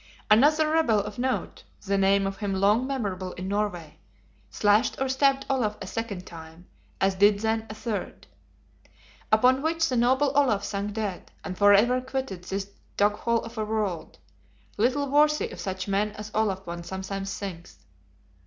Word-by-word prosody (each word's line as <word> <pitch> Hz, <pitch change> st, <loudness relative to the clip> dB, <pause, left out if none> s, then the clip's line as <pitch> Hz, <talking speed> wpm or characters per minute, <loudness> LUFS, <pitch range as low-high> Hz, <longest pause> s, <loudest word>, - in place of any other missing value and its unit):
Another 300 Hz, +8 st, +5 dB
rebel 315 Hz, -9 st, +3 dB
of 210 Hz, +2 st, -5 dB
note 260 Hz, +1 st, -2 dB, 0.2 s
(the 200 Hz, 0 st, 0 dB
name 195 Hz, 0 st, +3 dB
of 195 Hz, 0 st, -3 dB
him 200 Hz, -2 st, -2 dB
long 205 Hz, +6 st, +2 dB
memorable 195 Hz, -9 st, -3 dB
in 185 Hz, +1 st, -6 dB
Norway) 195 Hz, -6 st, -3 dB, 0.5 s
slashed 210 Hz, +3 st, +2 dB
or 270 Hz, -, 0 dB
stabbed 275 Hz, +1 st, +2 dB
Olaf 225 Hz, -6 st, 0 dB
a -, -, -6 dB
second 205 Hz, -5 st, -5 dB
time, 165 Hz, +1 st, -12 dB, 0.3 s
as 195 Hz, 0 st, +2 dB
did 205 Hz, +2 st, +4 dB
then 220 Hz, 0 st, -1 dB
a 210 Hz, -, -7 dB
third. 215 Hz, -1 st, -5 dB, 1.1 s
Upon 250 Hz, +5 st, +4 dB
which 320 Hz, +1 st, +1 dB
the 255 Hz, -, -1 dB
noble 260 Hz, +4 st, +3 dB
Olaf 255 Hz, -8 st, +3 dB
sank 205 Hz, 0 st, -3 dB
dead; 205 Hz, -4 st, -4 dB
and 185 Hz, -, -5 dB
forever 205 Hz, +6 st, +5 dB
quitted 260 Hz, -9 st, -5 dB
this 195 Hz, +1 st, -4 dB, 0.3 s
doghole 210 Hz, +3 st, +1 dB
of 230 Hz, -1 st, -8 dB
a -, -, 0 dB
world, 210 Hz, -6 st, -3 dB, 0.6 s
little 260 Hz, +6 st, +1 dB
worthy 300 Hz, +2 st, +2 dB
of -, -, -10 dB
such 190 Hz, 0 st, -4 dB
men 205 Hz, +1 st, 0 dB
as 215 Hz, 0 st, -8 dB
Olaf 195 Hz, -3 st, 0 dB
one 170 Hz, 0 st, -6 dB
sometimes 190 Hz, +2 st, -5 dB
thinks. 180 Hz, -4 st, -8 dB
210 Hz, 160 wpm, -26 LUFS, 195-250 Hz, 1.1 s, Another